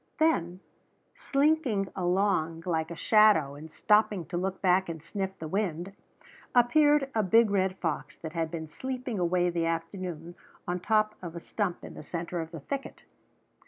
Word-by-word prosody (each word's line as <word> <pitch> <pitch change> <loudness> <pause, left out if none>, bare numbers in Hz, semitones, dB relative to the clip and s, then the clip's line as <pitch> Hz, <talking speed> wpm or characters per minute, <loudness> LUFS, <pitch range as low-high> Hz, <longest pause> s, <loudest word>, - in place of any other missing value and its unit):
Then, 185 - +1 0.5
slinking 275 -9 +1
along 175 -3 0
like 160 -3 -1
a 170 - -6
shadow 210 -8 +4
and 150 +3 -10
stopping 210 0 +2
to 180 - -4
look 190 +2 -2
back 185 -1 +2
and 160 -2 -6
sniff 190 +2 -4
the 160 - -6
wind, 185 0 -2 0.6
appeared 290 +3 +4
a 220 - +2
big 215 +2 +4
red 190 -1 +1
fox 150 -4 -3
that 160 -1 -8
had 165 -1 -1
been 160 -1 -5
sleeping 250 +4 -4
away 175 0 +2
the 170 -1 0
afternoon 165 0 -4 0.3
on 175 +1 -1
top 215 +2 +2
of 175 -2 -7
a - - -4
stump 185 0 -3
in - - -9
the - - -9
center 170 +2 -4
of 160 - -6
the 165 -3 -8
thicket. 275 - -6
180 Hz, 165 wpm, -29 LUFS, 165-215 Hz, 0.6 s, shadow